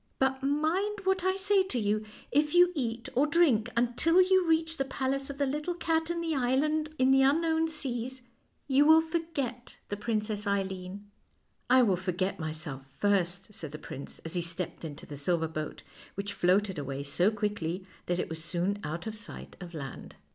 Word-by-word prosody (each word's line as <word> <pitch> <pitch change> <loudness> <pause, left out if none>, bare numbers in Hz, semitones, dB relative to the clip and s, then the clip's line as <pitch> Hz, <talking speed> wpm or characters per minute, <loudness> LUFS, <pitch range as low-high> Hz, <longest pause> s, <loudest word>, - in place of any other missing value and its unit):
But 265 0 +1
mind 325 +9 0
what 380 -1 +1
I 375 0 +2
say 390 0 +3
to 375 -9 -2
you: 215 -1 +1 0.3
if 295 +3 +2
you 355 0 +7
eat 235 -6 -3
or 275 +4 +3
drink 285 -9 +3
until 245 +9 +3
you 370 -1 +5
reach 325 0 +2
the 270 - 0
palace 270 +1 -2
of 280 - -6
the 285 - +2
little 300 +6 -2
cat 325 -1 0
in 340 0 -1
the 330 -1 -1
island 300 +4 +1
in 260 -1 +4
the 270 0 +6
unknown 320 +4 +3
seas, 260 -4 -4 0.4
you 275 +1 +5
will 320 +1 +8
for 325 +1 -1
get 265 -7 -5
the 205 - -2
Princess 210 -1 -2
Eileen." 195 0 -3 0.3
" - - -43
I 255 0 +7
will 195 -6 +3
forget 185 +1 -2
myself 155 -4 -4
first," 195 0 +1
said 155 -6 -7
the - - -4
prince, 140 -2 -8
as 165 - -5
he 175 - +1
stepped 170 +1 -3
into 150 -3 -7
the 145 - -8
silver 165 +3 +1
boat, 155 -1 -5 0.3
which 200 +1 -3
floated 190 -1 +2
away 140 0 -4
so 175 +7 +2
quickly 200 -4 -2 0.2
that 175 - +1
it - - -1
was 160 0 -6
soon 180 +4 -1
out 160 +3 -4
of 220 -1 -4
sight 215 -1 -6
of 175 -1 -8
land. 135 -4 -7
235 Hz, 190 wpm, -30 LUFS, -, 0.4 s, will